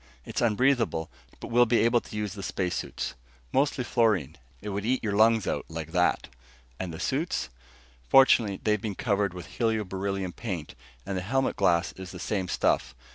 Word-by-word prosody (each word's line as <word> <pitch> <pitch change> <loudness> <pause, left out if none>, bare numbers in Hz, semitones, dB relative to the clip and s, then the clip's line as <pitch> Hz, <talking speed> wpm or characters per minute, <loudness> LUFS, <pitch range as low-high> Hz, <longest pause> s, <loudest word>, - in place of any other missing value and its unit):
"It's - - -3
unbreathable, 115 - +2 0.3
but - - -7
we'll 120 +1 +5
be 120 0 +3
able 115 +1 +3
to - - -11
use 105 -2 -2
the 100 - -7
space 90 -2 -2
suits. - - -4 0.4
Mostly 135 -1 +2
fluorine. 105 - +1 0.2
It 105 - -6
would 100 0 -3
eat 125 +4 0
your 105 -2 -1
lungs 110 0 +4
out - - -2
like - - -6
that!" - - +1 0.5
"And 90 - -3
the 80 - -7
suits?" 145 - -1 0.6
"Fortunately, 115 -7 +5
they've 105 -2 +1
been 105 -3 -3
covered 100 -4 0
with 90 - -7
helio 110 -2 0
beryllium 95 -1 -3
paint, 90 -7 -5 0.3
and 95 - -3
the 90 - -1
helmet 135 +8 0
glass 85 +1 +2
is 95 -1 -9
the 90 - -9
same 95 0 -2
stuff. 65 - 0
105 Hz, 185 wpm, -27 LUFS, 95-115 Hz, 0.6 s, we'll